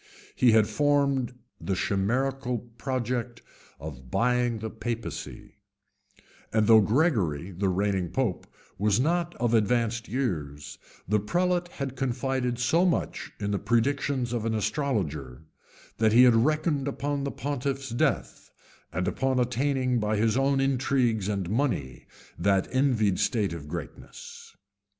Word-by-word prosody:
He 120 -3 +4
had 110 -1 +5
formed 140 -4 +1 0.2
the 95 - -2
chimerical 125 +7 0 0.2
project 125 -2 -3 0.4
of 70 -4 -9
buying 125 - +1
the 110 0 -5
papacy; 115 0 -6 0.9
and 110 -1 +2
though 110 0 +7
Gregory, 100 - +1
the 95 +2 -1
reigning 95 -1 0
pope, 125 -8 -2 0.3
was 105 +1 +2
not 170 +4 0
of 120 -1 0
advanced 115 +1 +1
years, 75 - -3 0.3
the 105 +3 +2
prelate 175 - 0
had 140 -6 -5
confided 130 -1 -1
so 160 +9 +2
much 180 -2 -1
in 100 -1 -2
the 100 - 0
predictions 125 +2 0
of 120 -3 -1
an 115 0 -1
astrologer, 85 - -2 0.6
that 110 -1 +3
he 125 +2 +8
reckoned 145 +4 +2
upon 140 0 -2
the 140 - -1
pontiff's 135 -2 -3
death, 120 - -1 0.4
and 90 +1 -2
upon 130 0 0
attaining, 125 0 +1
by 105 0 0
his 110 +1 +2
own 135 +1 +2
intrigues 130 -6 +1
and 100 -4 -2
money, 105 - -2 0.3
that 95 +1 +2
envied 120 -8 +2
state 105 -8 +1
of 75 -3 -8
greatness. 80 -4 -9
120 Hz, 130 wpm, -27 LUFS, 100-135 Hz, 0.9 s, he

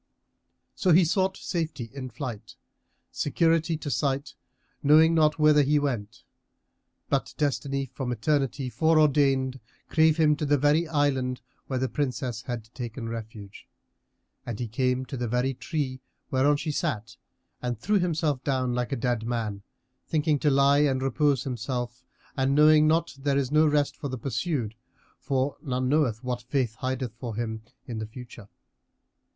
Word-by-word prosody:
So 180 -3 +2
he 175 +2 +6
sought 190 +2 +1
safety 160 - -4
in 130 -2 -6
flight, 120 -3 -7 0.6
security 165 +2 +1
to 150 -2 -5
sight, 140 0 -1 0.5
knowing 155 +3 +6
not 155 -2 +3
whither 150 -1 +5
he 145 +2 +3
went; 120 -8 -3 0.8
but - - -1
destiny 140 -1 -1
from 130 -2 -3
Eternity 135 +2 0
fore 160 +5 +3
ordained 135 -3 +2 0.3
drave 160 -1 +4
him 155 -2 +4
to 150 - -2
the 145 0 +4
very 150 +4 +3
island 135 -4 0 0.3
where 130 - -2
the 130 +1 0
Princess 125 -5 -2
had 115 -2 -6
taken 120 -1 -6
refuge, 110 -3 -8 0.8
and 115 -3 -6
he 120 - -2
came 125 +3 0
to 130 - -6
the 120 -1 -2
very 125 +3 0
tree 130 -1 -3 0.3
whereon 140 +3 +3
she 155 +1 -3
sat 115 -8 -3 0.5
and 125 -2 -2
threw 205 - +2
himself 155 -6 0
down, 130 -3 0
like 125 +2 -2
a - - +1
dead 120 -2 -1
man, 110 -4 -2 0.5
thinking 150 -2 +1
to 150 - +2
lie 140 +1 +4
and 135 -3 +2
repose 135 0 +1
himself 125 -1 -4 0.3
and 135 0 +1
knowing 155 +1 +6
not 165 +2 +1
there 140 0 +1
is 135 -1 -1
no 155 +1 +5
rest 145 -1 +1
for 145 - -5
the 130 -1 -4
pursued, 120 - -2 0.5
for 135 0 -1
none 130 -3 -1
knoweth 130 -5 +1
what 125 -1 -3
Fate 125 -2 -1
hideth 130 -2 -3
for 120 -4 -5
him 110 -1 -3 0.2
in 115 -3 -5
the 110 - -4
future. 120 -2 -11
135 Hz, 155 wpm, -27 LUFS, 125-150 Hz, 0.8 s, he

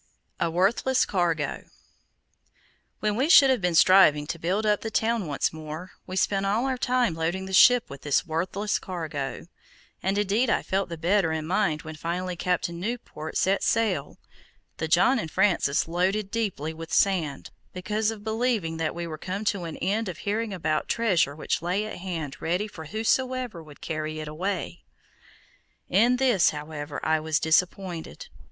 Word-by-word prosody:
A 170 - +1
WORTHLESS 200 +9 +2
CARGO 165 -6 -1 1.4
When 210 -1 0
we 265 +7 +1
should 275 -6 +8
have 255 - +1
been 180 -2 0
striving 160 -5 +6
to 165 +2 -5
build 190 +6 -1
up 210 -1 +2
the 225 - -4
town 220 -3 0
once 140 +1 -1
more, 155 +3 -7 0.2
we 185 - -5
spent 195 +1 +1
all 210 +6 +1
our 265 -1 0
time 250 -6 +1
loading 170 +4 -2
the 190 - -7
ship 245 +5 +6
with 140 -1 -10
this 145 +3 +1
worthless 185 +6 -1
cargo, 150 -8 -5 0.6
and 195 +2 0
indeed 210 +4 +1
I - - +1
felt 190 -1 -1
the 170 - -5
better 175 +1 +2
in 160 -1 -2
my 175 - -1
mind 155 -3 -4
when 155 -1 -8
finally 175 +3 -3
Captain 175 -1 -1
Newport 190 -7 -5
set 195 +1 +2
sail, 200 -11 0 0.6
the 160 - -2
John 190 +11 +4
and 165 - -4
Francis 155 -5 +2
loaded 190 +4 0
deeply 190 -9 -2
with 165 0 -9
sand, 170 -8 +1 0.2
because 210 +4 -1
of 220 -2 -6
believing 220 -7 -1
that 160 -1 -2
we 170 0 -4
were 155 -2 -7
come 195 +5 -4
to 185 -4 -6
an 165 - -6
end 205 +3 -1
of 175 - -6
hearing 215 +2 -1
about 155 -5 -1
treasure 185 -11 +1
which 155 - -2
lay 185 +5 -1
at 215 - -6
hand 165 -6 -5
ready 180 +6 -1
for 160 -6 -10
whosoever 225 - -1
would 150 -2 -15
carry 155 -1 -4
it 155 - -6
away. 175 +2 -4 1.1
In 230 +7 +4
this, 250 -8 +3
however, 150 -1 -6
I 160 0 +2
was 155 0 0
disappointed. 170 - -1
180 Hz, 175 wpm, -26 LUFS, 160-210 Hz, 1.4 s, should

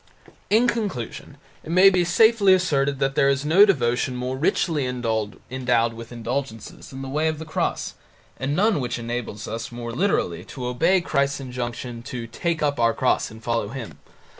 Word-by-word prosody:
In 225 +4 +4
conclusion 200 - -4 0.3
it - - -10
may 185 +3 +7
be 180 -1 +2
safely 200 +2 +5
asserted 140 -6 +1
that 135 0 0
there 135 - +3
is 135 +1 0
no 185 +7 +6
devotion 125 -6 +1
more 125 +1 -3
richly 150 +1 +1
endowed 120 0 -1
with 115 +1 -10
indulgences 120 -1 -5
than 135 0 -8
the - - -6
Way 150 +4 0
of 155 -1 -1
the 160 - -7
Cross, 155 - -2 0.4
and 140 +2 -2
none 205 -2 +2
which 125 -2 -2
enables 120 -3 -5
us 115 +2 -5
more 120 0 -6
literally 120 - 0
to 125 - -7
obey 165 +10 +2
Christ's 140 -3 0
injunction 120 -2 -5
to 120 -1 -6
take 160 +8 -2
up 145 -3 0
our 115 -1 +3
cross 130 - +1
and 110 +1 -13
follow 115 -3 -1
Him. 120 0 -8
130 Hz, 175 wpm, -23 LUFS, 120-160 Hz, 0.4 s, may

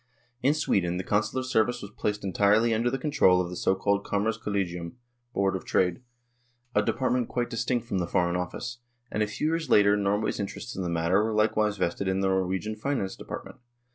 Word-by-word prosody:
In 140 +4 +3
Sweden, 90 - +1
the 90 - -3
Consular 110 +7 0
service 120 -2 +1
was 100 - -8
placed 105 -1 -2
entirely 105 +4 +3
under 115 +2 +1
the 135 - -1
control 135 -10 +3
of 90 -1 -2
the - - -5
so 95 - +1
called 100 +1 +1
Kommerce 105 +2 -1
Kollegium 90 -4 -2 0.4
(Board 100 -4 +1
of 95 - -4
Trade), 90 +1 +1 0.7
a - - +4
department 125 -2 0
quite 120 -1 -2
distinct 120 0 -1
from 100 -5 -1
the 85 - -1
Foreign 85 0 +1
Office, 115 +7 -4 0.3
and 105 - -1
a 105 - +2
few 105 +8 -3
years 165 -3 -1
later 105 -2 +6
Norway's 105 +2 0
interests 105 +4 -5
in 95 - -3
the 90 - -2
matter 85 +4 +2
were 110 0 -1
likewise 105 -1 +2
vested 95 +1 -1
in 95 0 +1
the 95 - +2
Norwegian 95 +3 -1
Finance 110 -4 -2
De - - -11
partment. - - -8
105 Hz, 200 wpm, -27 LUFS, 95-115 Hz, 0.7 s, later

